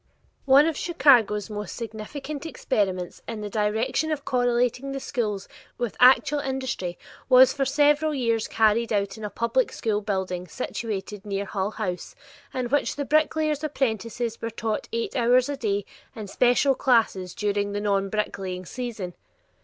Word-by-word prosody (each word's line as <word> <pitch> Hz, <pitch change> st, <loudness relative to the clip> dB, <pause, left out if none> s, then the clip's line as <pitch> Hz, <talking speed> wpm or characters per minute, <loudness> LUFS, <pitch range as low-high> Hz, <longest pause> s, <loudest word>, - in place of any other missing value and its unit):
One 275 Hz, +2 st, +7 dB
of 325 Hz, -1 st, 0 dB
Chicago's 245 Hz, -, +3 dB
most 210 Hz, -1 st, -6 dB
significant 270 Hz, +6 st, -6 dB
experiments 190 Hz, -, -2 dB
in 225 Hz, -2 st, -5 dB
the 205 Hz, -1 st, -5 dB
direction 220 Hz, +9 st, 0 dB
of 290 Hz, -2 st, -3 dB
correlating 245 Hz, +2 st, +1 dB
the 275 Hz, -, -3 dB
schools 215 Hz, -8 st, -3 dB, 0.3 s
with 240 Hz, -3 st, -3 dB
actual 265 Hz, +3 st, +6 dB
industry 260 Hz, -10 st, -3 dB, 0.3 s
was 255 Hz, 0 st, +7 dB
for 275 Hz, -1 st, 0 dB
several 295 Hz, +3 st, +3 dB
years 230 Hz, -4 st, 0 dB
carried 225 Hz, +1 st, +2 dB
on 200 Hz, -2 st, +2 dB
in 220 Hz, -, -10 dB
a 210 Hz, -, -3 dB
public 235 Hz, +4 st, 0 dB
school 215 Hz, -2 st, -1 dB
building 190 Hz, -3 st, -3 dB
situated 210 Hz, -3 st, -5 dB
near 200 Hz, -1 st, -3 dB
Hull 195 Hz, 0 st, -2 dB
House, 210 Hz, -, -5 dB, 0.4 s
in 255 Hz, -1 st, -2 dB
which 290 Hz, +2 st, +1 dB
the 285 Hz, -, -3 dB
bricklayers' 310 Hz, 0 st, +1 dB
apprentices 230 Hz, -4 st, -2 dB
were 230 Hz, -, -2 dB
taught 220 Hz, -1 st, -3 dB
eight 230 Hz, 0 st, -3 dB
hours 250 Hz, +1 st, +3 dB
a 285 Hz, -, -1 dB
day 205 Hz, -4 st, -1 dB, 0.3 s
in 215 Hz, -, -6 dB
special 245 Hz, +6 st, +3 dB
classes 225 Hz, -9 st, +1 dB
during 205 Hz, -1 st, -1 dB
the 205 Hz, -, -1 dB
non 200 Hz, -1 st, 0 dB
bricklaying 190 Hz, -3 st, -3 dB
season. 225 Hz, -6 st, -5 dB
230 Hz, 155 wpm, -25 LUFS, 205-265 Hz, 0.4 s, One